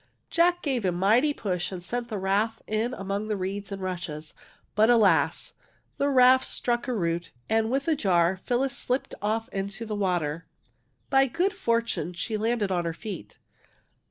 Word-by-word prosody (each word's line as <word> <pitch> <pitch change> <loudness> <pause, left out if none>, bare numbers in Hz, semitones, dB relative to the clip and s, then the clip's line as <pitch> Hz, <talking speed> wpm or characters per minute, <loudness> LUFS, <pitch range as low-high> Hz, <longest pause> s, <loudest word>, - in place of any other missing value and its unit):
Jack 350 +1 +3
gave 260 -6 0
a 185 - +2
mighty 215 - +3
push 185 -10 -2
and 180 -2 -6
sent 240 +6 -3
the 220 -3 -4
raft 200 +4 0
in 220 +4 -1
among 200 +2 -3
the 210 -1 -1
reeds 195 +2 -4
and 195 -1 -5
rushes. 170 -4 -5 0.4
But, 220 +2 +4
alas, 190 -10 +3 0.4
the 280 - +1
raft 260 -1 +6
struck 240 +1 -1
a 255 - 0
root, 170 -3 -1 0.2
and 220 0 +2
with 270 +3 0
the 320 - +2
jar 185 - +2
Phyllis 260 +2 0
slipped 255 0 -2
ofl 220 +2 -1
into 200 +3 -4
the 215 -1 -3
water. 175 -5 -1 0.6
By 270 0 +5
good 360 +9 0
fortune 230 - -1
she 195 +6 -3
landed 215 -2 0
on 175 -2 +1
her 165 -1 -2
feet. 200 -2 -8
215 Hz, 170 wpm, -27 LUFS, 185-245 Hz, 0.6 s, raft